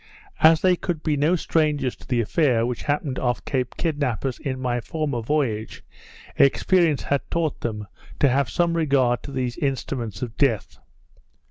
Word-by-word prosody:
As 160 0 +6
they 185 -1 +4
could 170 -3 -4
be 155 -2 +1
no 150 +5 +2
strangers 150 -6 0
to - - -16
the 125 -3 +1
affair 120 -1 +2
which 120 -1 -3
happened 145 -2 -1
off 120 -3 -1
Cape 130 -3 -2
Kidnappers 140 -6 -1
in 130 -2 -4
my 120 -2 -1
former 145 -3 -3
voyage, 115 -5 -2 0.5
experience 160 +2 +3
had 140 -1 0
taught 165 -3 -1
them 105 -3 -3 0.3
to 140 - +5
have 135 -1 +1
some 170 -1 +1
regard 135 -7 +2
to 140 - -9
these 125 -3 -3
instruments 125 - -3
of 115 -3 -6
death. 120 -8 0
135 Hz, 160 wpm, -23 LUFS, 120-155 Hz, 0.5 s, As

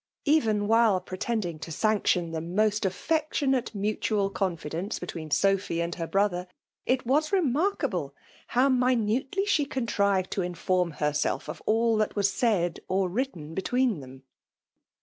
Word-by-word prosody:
Even 225 -9 +2
while 225 -3 +4
pretending 185 -2 -3
to 160 - -7
sanc 215 +6 0
tion 175 -3 +2
the 160 -1 -3
most 205 +5 +1
affectionate 270 - 0
mutual 205 0 0
confidence 175 0 -3
between 165 -3 -6
Sophy 195 +1 +1
and 170 0 -1
her 165 -2 -4
brother, 190 -2 0 0.4
it 255 0 +1
was 300 +5 +2
re* 395 - +4
markable 325 +6 0 0.3
how 255 +3 +3
minutely 255 - +1
she 350 -8 +2
contrived 200 -8 0
to 195 - -1
in 180 0 -3
form 180 0 +1
herself 150 0 -1
of - - -7
all 225 +1 +3
that 215 -1 0
was 200 -1 +2
said 195 -9 +1
or 190 0 +1
written 180 - -3
between 235 - 0
them. 130 0 -12
205 Hz, 150 wpm, -27 LUFS, 180-245 Hz, 0.4 s, while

